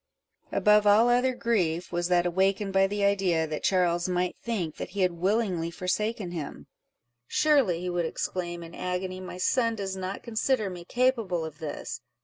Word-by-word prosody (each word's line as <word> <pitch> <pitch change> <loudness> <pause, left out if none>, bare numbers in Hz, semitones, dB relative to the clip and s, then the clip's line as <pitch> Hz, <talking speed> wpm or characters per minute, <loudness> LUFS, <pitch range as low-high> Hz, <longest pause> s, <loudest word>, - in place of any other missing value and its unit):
Above 210 0 +4
all 215 +4 +6
other 250 +1 +3
grief, 185 -9 0
was 175 0 -1
that 175 -1 +3
awakened 195 +3 +1
by 195 0 +4
the 205 +1 -2
idea, 190 -5 +2
that 155 -1 -4
Charles 175 -1 +2
might 180 0 0
think 185 -10 -3
that - - -5
he - - +1
had 185 -1 +3
willingly 185 -1 0
forsaken 185 +3 -2
him—"Surely," 170 - -1
he 180 - -3
would 175 -1 0
exclaim, 175 0 -4
in 165 0 -11
agony, 185 0 -3
"my 185 -1 -7
son 230 +4 +1
does 195 -2 -4
not 190 +1 -5
consider 220 -2 0
me 175 -1 -8
capable 230 -9 +1
of 155 -1 -9
this! 155 -3 -5
185 Hz, 165 wpm, -27 LUFS, 175-210 Hz, -, all